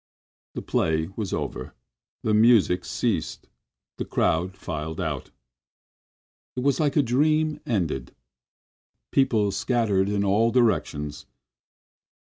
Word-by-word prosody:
The - - -5
play 80 0 0
was 105 -4 -4
over, - - -4 0.5
the 110 - +1
music 105 -5 +4
ceased, - - -2 0.5
the - - -2
crowd 90 +4 0
filed 80 0 -5
out. 80 -7 -3 1.3
It 125 - -2
was 140 +3 +1
like 145 -3 +1
a 145 - +5
dream 150 +4 +1
ended. 85 - -2 1.0
People 115 -7 +2
scattered 100 -2 +1
in 100 -1 0
all 105 +4 +3
directions. 75 - 0
105 Hz, 105 wpm, -25 LUFS, 90-125 Hz, 1.3 s, a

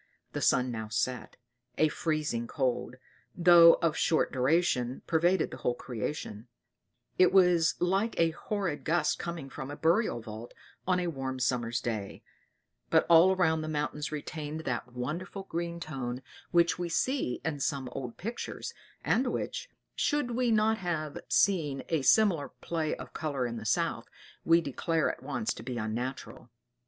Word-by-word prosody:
The - - -3
sun 125 0 +3
now 110 -2 -4
set: 120 +2 -2 0.4
a 155 - +4
freezing 150 -7 -2
cold, 125 0 -1 0.4
though 170 -1 +8
of 165 -2 +2
short 160 - +2
duration 130 -2 +1
pervaded 170 +2 +2
the - - -7
whole 120 -1 -1
creation; 120 -2 -5 0.7
it 185 -1 +6
was 180 -4 +4
like 195 +5 0
a 165 -1 +4
horrid 185 -2 -3
gust 160 -1 +1
coming 170 -5 -5
from 135 0 -7
a 145 - -5
burial 165 - +2
vault 110 +1 -9 0.3
on 180 -1 +3
a 180 - -1
warm 135 -5 -3
summer's 120 -2 0
day 110 -5 -4 0.7
but - - +4
all 170 +3 +7
around 160 -4 +2
the 155 - -4
mountains 150 0 -2
retained 155 +1 -5
that 125 -4 -3
wonderful 160 +11 -5
green 170 -1 -4
tone 130 -6 -5 0.3
which 170 0 +3
we 175 -1 -2
see 250 - 0
in 155 -3 -2
some 135 -1 -1
old 125 -3 -6
pictures, 230 +5 -5 0.3
and 255 +2 +2
which, - - -3 0.3
should 290 -4 0
we 245 +1 +1
not 220 0 +3
have 160 -5 -3
seen 155 -9 +2
a 160 -3 +1
similar 175 -2 +4
play 160 -2 -3
of - - -10
color 145 -5 -2
in 120 -1 -4
the 110 -1 -5
South, - - 0 0.3
we 165 +1 +5
declare 165 +2 0
at - - -12
once 125 -6 -2
to - - -10
be 125 +1 -5
unnatural. 120 +2 -4
155 Hz, 155 wpm, -30 LUFS, 125-175 Hz, 0.7 s, though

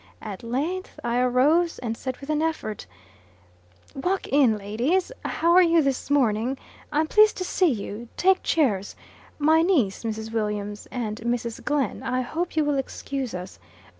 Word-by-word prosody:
At 205 -3 -6
length, 295 +11 -3
I 240 +1 0
arose, 285 +8 +3
and 230 -2 -3
said 255 +2 -5
with 280 +2 -5
an 305 0 +1
effort, 315 -10 -3 1.1
"Walk 360 +8 -1
in, 260 -6 +4
ladies! 240 - 0
How 335 +1 +1
are 365 +2 +7
you 335 -2 +4
this 275 -1 -1
morning? 250 -2 +2 0.3
I'm 305 +2 +2
pleased 425 +6 +5
to 370 - -2
see 365 -1 +2
you. 225 -1 -4
Take 380 +1 +4
chairs. 210 -11 +1 0.4
My 315 +2 +4
niece, 285 - +1
Mrs. 220 0 -4
Williams, 210 -2 -3
and 220 -4 -3
Mrs. 235 0 -3
Glenn. 290 -2 -1
I 255 0 -1
hope 330 +8 -3
you 310 -1 +2
will 290 -2 +1
excuse 270 -3 -4
us. 180 +1 -8
265 Hz, 160 wpm, -25 LUFS, 225-320 Hz, 1.1 s, are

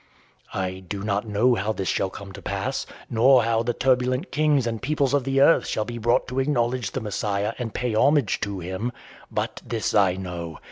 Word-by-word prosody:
I 95 -1 -2
do 100 +2 -6
not 105 +1 -1
know 110 +5 +3
how 110 0 0
this 95 -3 -4
shall 95 - 0
come 100 +1 -9
to - - -10
pass, - - -3 0.2
nor 125 +2 +5
how 115 0 +2
the 120 +1 -1
turbulent 130 +4 +1
kings 150 -4 +2
and 115 -2 -3
peoples 140 -1 0
of 140 -2 +1
earth 135 +4 +4
shall 110 - -1
be 120 +1 -6
brought 120 +3 +2
to 125 +1 -2
acknowledge 125 -5 0
the - - -4
Messiah 105 0 -1
and 120 -3 -3
pay 120 0 -2
homage 135 0 +3
to 100 -1 -3
him. 95 +7 -3 0.4
But - - -3
this 115 -2 -2
I 100 -4 +4
know. 85 -4 -6
115 Hz, 195 wpm, -24 LUFS, 100-125 Hz, 0.4 s, nor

